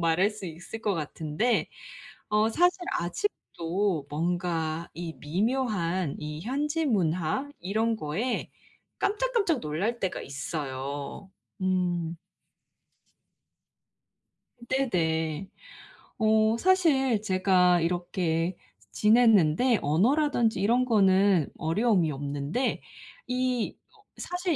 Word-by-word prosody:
말할 170 +4 +3
수 210 -3 -8
있을 175 +7 -8
것 210 -3 0
같은데 160 +7 -1 0.6
어 210 +1 +2
사실 355 +8 +2 0.2
아직도 175 - -2
뭔가 165 0 -2
이 170 -1 -6
미묘한 185 - -1
이 150 0 -6
현지 295 - -1
문화 185 - 0
이런 220 +5 0
거에 210 +7 -3 0.5
깜짝 - - 0
깜짝 360 - +1
놀랄 190 +11 -2
때가 190 - -2
있어요. 140 +4 -5 0.3
음. 175 -3 0 2.5
네네. 170 - 0 0.7
어 220 0 +3
사실 275 - +3
제가 185 -3 +3
이렇게 175 0 -1 0.3
지냈는데 220 -1 +4
언어라든지 235 - +2
이런 240 +5 +3
거는 195 - +4
어려움이 175 0 +2
없는데 145 - -2 0.5
이 250 -2 -1 0.2
어 425 - -23 0.2
사실 355 -2 -2
190 Hz, 185 characters per minute, -27 LUFS, 165-240 Hz, 2.5 s, 지냈는데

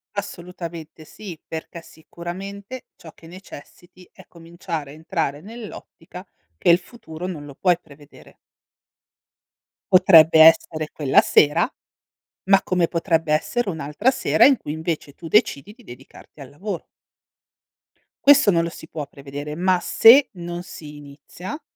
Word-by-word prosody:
Assolutamente 170 -5 -8
sì, 180 -2 -11
perché 165 +1 -8
sicuramente 190 +9 -9
ciò 160 - -14
che - - -19
necessiti 180 +1 -14
è 190 - -17
cominciare 165 -3 -8
a - - -12
entrare 155 -2 -4
nell'ottica 225 +1 -11 0.3
che 175 - 0
il 170 - +7
futuro 180 -5 -11
non 165 -6 -6
lo 140 -2 -12
puoi 180 -2 +1
prevedere. 145 -1 -18 1.6
Potrebbe 165 -4 +6
essere 155 -1 +4
quella 140 -3 +3
sera, 160 +7 +3 0.8
ma 195 0 +4
come 180 -2 0
potrebbe 165 -2 -1
essere 210 +8 -1
un'altra 160 - -1
sera - - +3
in 275 -1 +5
cui 150 - -7
invece 160 -2 -5
tu 165 +3 -11
decidi 205 - +1
di 245 +2 -21
dedicarti 135 - -15
al 135 - -11
lavoro. 180 +5 -6 1.4
Questo 280 -7 +6
non 170 -1 +1
lo 170 - -3
si 160 - -12
può 150 -3 -6
prevedere, 145 +2 -9
ma 180 +2 0
se 265 +5 +6
non 175 0 -7
si 150 -4 -11
inizia, 145 - -10
170 Hz, 135 wpm, -21 LUFS, 155-190 Hz, 1.6 s, il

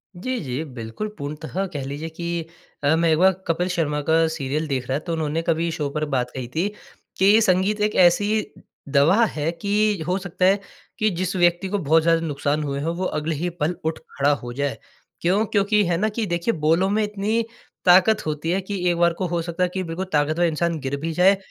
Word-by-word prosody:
जी, 250 +8 -3
जी, 130 +2 -3
बिल्कुल 115 - -5
पूर्णतः 155 +6 -4
कह 145 - -3
लीजिए 145 +4 -5
कि 170 0 -4 0.4
अ, 145 +3 +4
मैं 165 0 +2
एक 155 - +3
बार 190 +3 +5 0.2
कपिल 170 +2 0
शर्मा 155 -4 0
का 165 0 +4
सीरियल 155 0 -2
देख 130 -3 -2
रहा 135 - +1
तो 170 +1 -5
उन्होंने 160 0 -1
कभी 165 0 +1
शो 150 -3 -2
पर 150 +2 -2
बात 125 -1 0
कही 130 -2 -5
थी 170 +5 +1 0.5
कि 200 +3 +6
संगीत 200 +1 +2
एक 210 0 +1
ऐसी 205 +4 +2 0.4
दवा 150 +11 +4
है 155 -5 -2
कि 205 -2 +1
हो 180 +1 +1
सकता 185 -1 -1
है 195 +2 +4 0.4
कि 215 - +3
जिस 185 0 -2
व्यक्ति 175 +1 +2
को 205 - 0
बहुत 160 -1 +3
ज़्यादा 165 0 +3
नुकसान 145 +1 -1
हुए 140 -1 -3
हों 165 +3 -2
वो 185 +2 -2
अगले 155 -1 -2
ही 175 +5 -2
पल 160 +4 0
उठ 160 0 -1 0.2
खड़ा 140 +1 +3
हो 120 0 -6
जाए। 140 +1 -2 0.4
क्यों? 190 +6 +2
क्योंकि 210 0 +2
है 170 -1 +1
ना 215 +5 +1
कि 220 +1 -2
देखिए 175 +4 0
बोलों 165 +5 +2
में 215 +2 +1
इतनी 210 +2 0 0.4
ताकत 190 +5 +5
होती 155 +1 -3
है 185 - +1
कि 200 +2 -5
एक 175 - 0
बार 170 0 +3
को 190 - 0
हो 170 0 -1
सकता 170 +2 -2
है 180 - +2
कि 190 - -2
बिल्कुल 170 +2 -4
ताकतवर 155 +3 +2
इंसान 170 0 0
गिर 135 0 -3
भी 165 +1 -2
जाए। 190 +3 +5
170 Hz, 220 wpm, -23 LUFS, 150-190 Hz, 0.5 s, कि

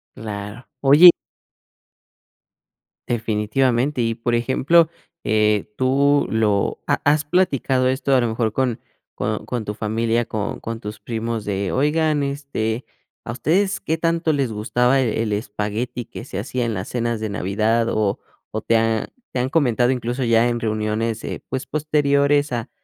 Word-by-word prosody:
Claro. 105 +2 -7 0.2
Oye 145 +6 +9 2.0
Definitivamente. 120 +4 0
Y 115 -1 0
por 120 +1 -2
ejemplo, 140 +7 +3 0.3
eh, 105 -1 +1
tú 140 +2 +3
lo 105 -3 +1
¿Ha - - +1
has 150 +1 +3
platicado 140 -6 +1
esto, 130 +1 +1
a 130 - +4
lo 120 - +1
mejor 110 0 -1
con 130 -2 0 0.3
con 105 +1 -3
con 120 -3 -3
tu 105 - -4
familia, 115 +2 0
con 105 -2 -4
con 115 0 -5
tus 105 -2 -7
primos? 115 0 -4
De, 100 -1 -2
oigan, 150 +1 +1
este, 140 -5 -3 0.4
¿a 120 - -5
ustedes 185 - +1
qué 160 - -2
tanto 165 -1 +1
les 135 -5 0
gustaba 125 +5 +1
e 115 -3 0
el 105 -2 -1
espagueti 105 +4 -3
que 115 - -9
se 95 - -5
hacía 120 +4 -2
en 115 - -1
las 95 - -4
cenas 120 -2 -1
de 110 0 -3
Navidad? 110 +4 0
O 105 -2 0 0.3
o 110 - -3
te 115 - +2
ha 110 -1 0 0.2
te 130 - -2
han 125 +1 0
comentado 125 -5 +2
incluso, 125 +1 -2
ya 115 0 +3
en 120 -1 -1
reuniones, 110 +1 -1
eh, - - -5
pues, 130 +1 -4
posteriores 145 -1 +2
a 120 0 -3
120 Hz, 160 wpm, -21 LUFS, 110-135 Hz, 2.0 s, Oye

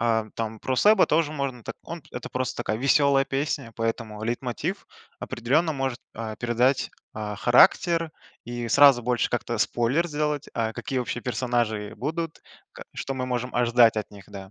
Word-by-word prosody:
а, 115 -2 +1
там 110 -1 -3
про 130 - -1
Сэба 210 +6 +5
тоже 155 -1 +2
можно 135 -5 -4
так. - - -6
Он 170 -2 -7
п 155 - -22
это 125 - -6
просто 130 0 -2
такая 110 - -2
веселая 140 0 +4
песня, 140 -2 -2
и - - -24
поэтому 115 -2 -3
лейтмотив 130 - -3 0.3
определенно 145 +8 0
может, 135 -3 -3
а, 110 -1 -5
передать, 120 +3 +1 0.2
а, 105 -1 -4
характер 165 - +4 0.3
и 120 0 -5
сразу 140 -3 +6
больше 125 0 0
как-то 120 -1 -2
спойлер 125 +11 +1
сделать, 150 -1 -2
а, 115 -1 -1
какие, 130 +3 -3
вообще, 120 0 -3
персонажи 120 -4 -1
будут, 160 +6 -4 0.3
ка - - -10
что 135 - -4
мы 130 -1 -3
можем 125 0 -3
ожидать 120 -2 +4
от 105 - -3
них, 100 -1 -12
да. 95 -1 -10
125 Hz, 175 wpm, -25 LUFS, 115-145 Hz, 0.3 s, сразу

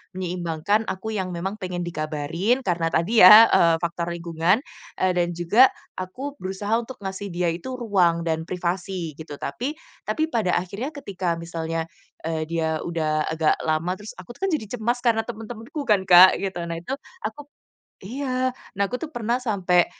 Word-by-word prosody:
Menyeimbangkan 180 +3 -1
aku 190 +4 -4
yang 185 -2 -2
memang 190 +4 -3
pengen 180 -1 -4
dikabarin, 165 - -1
karena 170 -2 0
tadi 210 +7 +3
ya, 215 +5 +11
eee, 170 -1 +5
faktor 170 0 -2
lingkungan, 170 +4 +1 0.4
eee, 185 - +3
dan 175 0 +1
juga 210 +10 +6 0.3
aku 260 +11 -6
berusaha 195 +3 -4
untuk 245 +2 -8
ngasih 195 +1 -5
dia 175 0 0
itu 180 +10 -5
ruang 180 -7 +2
dan 160 0 0
privasi 180 -2 -3
gitu 150 -2 -7
tapi 245 - -3 0.4
tapi 315 0 0
pada 220 - +1
akhirnya 200 - -5
ketika 190 -10 -2
misalnya, 165 -1 -3 0.4
eee, 160 -1 -1
dia 160 -1 -1
udah 155 -2 -1
agak 160 -1 +2
lama 160 +3 0
terus 210 - -8
aku 185 +6 -10
tuh - - -10
kan - - -2
jadi 220 - -4
cemas 240 +3 0
karena 230 -2 +3
teman-temanku 230 +5 -7
kan 205 -3 +3
Kak 180 +1 +9
gitu. 190 -3 -3
Nah 170 0 -4
itu 255 +10 -5 0.3
aku 225 +7 -5 0.6
iya. 255 +2 -1 0.3
Nah 200 - +3
aku 250 - -2
tuh 320 - -4
pernah 235 0 0
sampai, 185 -6 +2
185 Hz, 170 wpm, -24 LUFS, 170-225 Hz, 0.6 s, ya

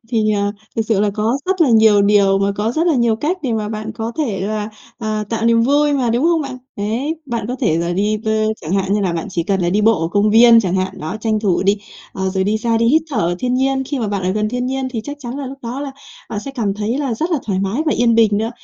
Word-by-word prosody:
Thì, 220 -3 +1
ờ, 205 0 0 0.2
thực 225 - +2
sự 220 -2 0
là 210 0 +2
có 225 +5 0
rất 375 -1 0
là 315 - +5
nhiều 220 -2 +5
điều 200 -1 +4
mà 200 0 +1
có 215 +3 -1
rất 330 +5 0
là 330 - +3
nhiều 235 -3 +2
cách 315 +10 -1
để 255 -5 -1
mà 215 -2 -2
bạn 215 0 -5
có 225 +1 -4
thể 230 -11 -1
là, 210 +2 -2 0.3
ờ, 215 -2 -2
tạo 225 -1 -2
niềm 230 0 +4
vui 290 +3 +3
mà, 255 -5 +1
đúng 240 +6 +1
không 335 -2 +3
bạn? 270 -2 -6 0.2
Đấy, 230 +10 -2
bạn 235 -5 -3
có 250 - -3
thể 165 -9 +2
là 170 +1 -1
đi, 210 +4 0
ờ, 220 - +1 0.3
chẳng 160 +3 -5
hạn 195 0 0
như 210 - +2
là 185 -4 0
bạn 165 - -3
chỉ 170 -2 -1
cần 195 +2 0
là 175 - +1
đi 205 +3 +2
bộ 220 -3 +3
ở 165 - -1
công 205 +2 +2
viên 230 +1 +7
chẳng 185 -2 -1
hạn, 185 0 -2
đó, 160 +7 -4
tranh 220 -1 0
thủ 195 -4 +1
đi. 200 +1 +3 0.4
Ờ, 190 0 -2
rồi 190 0 0
đi 215 +2 0
xa 230 0 0
đi 230 0 +2
hít 310 +5 +4
thở 270 - -3
ở 175 0 0
thiên 250 +3 -1
nhiên, 265 +1 +1
khi 280 0 -3
mà 220 -3 -2
bạn 200 -2 -2
ở 185 - 0
gần 215 +1 0
thiên 250 +2 -2
nhiên 265 0 -2
thì 235 -3 -3
chắc 290 0 -6
chắn 250 0 -6
là 275 - -4
lúc 270 +1 -8
đó 240 +4 -5
là 285 -1 -4 0.4
bạn 205 - -3
sẽ 275 - -7
cảm 220 -7 -2
thấy 215 +6 -2
là 270 -5 -1
rất 320 +10 -2
là 325 - +1
thoải 190 -3 -1
mái 200 +9 -1
và 305 - +3
yên 235 -1 +2
bình 225 -2 +4
nữa. 225 +1 -1
220 Hz, 300 wpm, -18 LUFS, 205-255 Hz, 0.4 s, viên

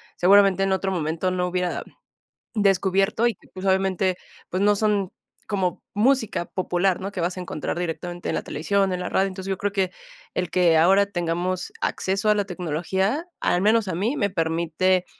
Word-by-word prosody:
seguramente 195 +1 +5
en 195 - +1
otro 190 0 0
momento 165 +1 -1
no 180 0 0
hubiera 180 0 -2 0.7
descubierto 195 +1 +2
y 235 - 0
que, - - -23
pues, 185 +1 -7
obviamente, 190 -1 +1 0.3
pues, 185 - -2
no 205 +1 +4
son 205 -3 0 0.3
como 190 -4 -1
música 225 -3 +2
popular, 185 0 0
¿no?, 195 +2 -5
que 185 - -3
vas 180 +2 -1
a - - -3
encontrar 175 -1 -4
directamente 175 +1 -4
en - - -1
la - - -1
televisión, 195 +5 0
en 180 - -2
la 180 - -3
radio. 195 - +2
Entonces, 190 0 -7
yo 190 - -1
creo 205 +1 -1
que 190 -2 0 0.4
el 180 -2 -2
que 175 -3 +4
ahora 190 +5 +5
tengamos 175 -1 -2
acceso 195 +2 -1
a 210 - +5
la 205 - +1
tecnología, 190 - -2
al 175 - +1
menos 215 +1 +3
a 185 - -2
mí, 220 - -1
me 200 - +1
permite 170 +1 +1
190 Hz, 185 wpm, -24 LUFS, 180-200 Hz, 0.7 s, seguramente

